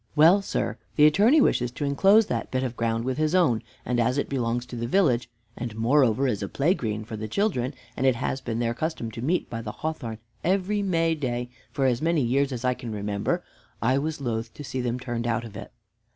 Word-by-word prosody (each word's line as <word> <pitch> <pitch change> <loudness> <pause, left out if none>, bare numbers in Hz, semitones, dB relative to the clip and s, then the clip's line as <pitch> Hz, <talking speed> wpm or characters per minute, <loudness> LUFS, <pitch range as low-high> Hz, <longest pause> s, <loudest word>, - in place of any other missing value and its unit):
Well, 165 +6 +6
sir, - - -2 0.2
the 150 - +6
Attorney 210 - +5
wishes 125 - +2
to 145 - -3
enclose 195 +10 +5
that 115 -9 -3
bit 130 0 -1
of 125 -2 -3
ground 115 0 -1
with 130 +2 -2
his 155 +3 +2
own, 135 -12 +3 0.2
and 125 -1 0
as 125 +3 +2
it 140 - -1
belongs 120 -2 -1
to 125 - -8
the 120 0 -3
village, 125 -7 +2 0.3
and 120 -2 -5
moreover 125 +2 +3
is 105 -6 -1
a 100 - -3
play 150 +6 +2
green 110 - -3
for 110 - -6
the 110 0 -4
children, 130 - 0 0.2
and - - -2
it 130 - +4
has 130 +2 -2
been 115 -2 -3
their 115 0 0
custom 140 -4 -3
to 115 - -7
meet 165 +8 0
by 115 -1 -5
the 110 -2 -5
hawthorn 135 -8 -4 0.3
every 195 +3 +1
Mayday 160 -10 0 0.2
for 135 +2 0
as 125 -2 +2
many 165 -3 +2
years 135 +3 +1
as 125 -1 -4
I 125 - +3
can 125 -2 -7
remember, 100 -1 -2 0.4
I 130 +4 +2
was 155 +1 -3
loth 115 -3 -3
to 145 - -8
see 130 -1 -3
them 120 0 -2
turned 120 -2 -3
out 115 -1 0
of 110 -2 -10
it." 115 - -8
125 Hz, 225 wpm, -26 LUFS, 115-155 Hz, 0.4 s, Well